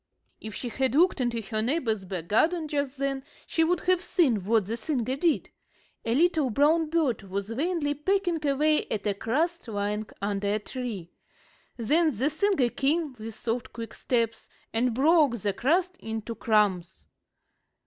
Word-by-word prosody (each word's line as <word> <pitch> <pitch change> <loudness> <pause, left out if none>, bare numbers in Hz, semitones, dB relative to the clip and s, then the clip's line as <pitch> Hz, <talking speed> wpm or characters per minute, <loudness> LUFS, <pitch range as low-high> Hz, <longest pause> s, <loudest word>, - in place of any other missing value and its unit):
If 220 -2 -8
she 245 - -4
had 260 +2 0
looked 345 -2 +4
into 235 -2 -1
her 215 +2 -2
neighbor's 225 -6 0
back 180 -3 -5
garden 315 - +2
just 285 -2 -2
then 275 0 -2 0.2
she 325 - +1
would 335 +1 +1
have 365 -1 +2
seen 305 - +2
what 220 -1 +3
the 220 +4 -3
singer 255 0 -2
did. 320 +2 0 0.5
A 230 +1 0
little 315 -3 +3
brown 305 +6 +3
bird 305 -9 +1
was 200 +2 -4
vainly 295 +3 0
pecking 350 +1 0
away 300 +2 +2
at 215 - -3
a 205 - +2
crust 300 - -1
lying 210 0 -2
under 200 0 -1
a - - +2
tree. 215 -6 -6 0.7
Then 300 +3 +2
the 270 +7 +1
singer 320 -6 +2
came, 295 +1 0
with 220 0 -7
soft, 235 +2 -3
quick 230 -1 -7
steps, 230 -2 -1 0.2
and 230 +1 +1
broke 290 -2 +4
the 205 -1 -1
crust 360 - +1
into 225 - -5
crumbs. 200 -6 +1
255 Hz, 160 wpm, -27 LUFS, 220-315 Hz, 0.7 s, looked